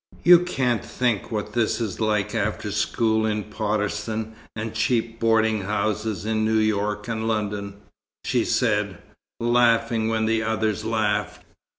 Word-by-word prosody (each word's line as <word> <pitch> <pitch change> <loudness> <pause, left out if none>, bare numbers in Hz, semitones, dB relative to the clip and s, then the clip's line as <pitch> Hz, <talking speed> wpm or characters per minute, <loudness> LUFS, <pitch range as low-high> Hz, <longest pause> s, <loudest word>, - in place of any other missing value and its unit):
"You 175 0 +9
can't 130 -10 0
think 120 -5 -1
what 105 -1 -3
this 120 -1 +1
is 110 -6 -3
like 105 -2 0
after 105 -1 -2
school 110 +1 +1
in 105 -1 -1
Potterston 105 +1 -2 0.2
and 110 0 -4
cheap 115 +1 0
boarding 110 -1 +2
houses 105 0 -2
in 110 0 0
New 110 0 +2
York 105 -1 0
and 110 -1 -2
London," 105 -2 -2 0.5
she - - +1
said, - - 0 0.4
laughing 115 -1 +2
when 110 0 +1
the 110 0 +1
others 110 -1 -1
laughed. 105 -2 -1
110 Hz, 135 wpm, -24 LUFS, 105-115 Hz, 0.5 s, You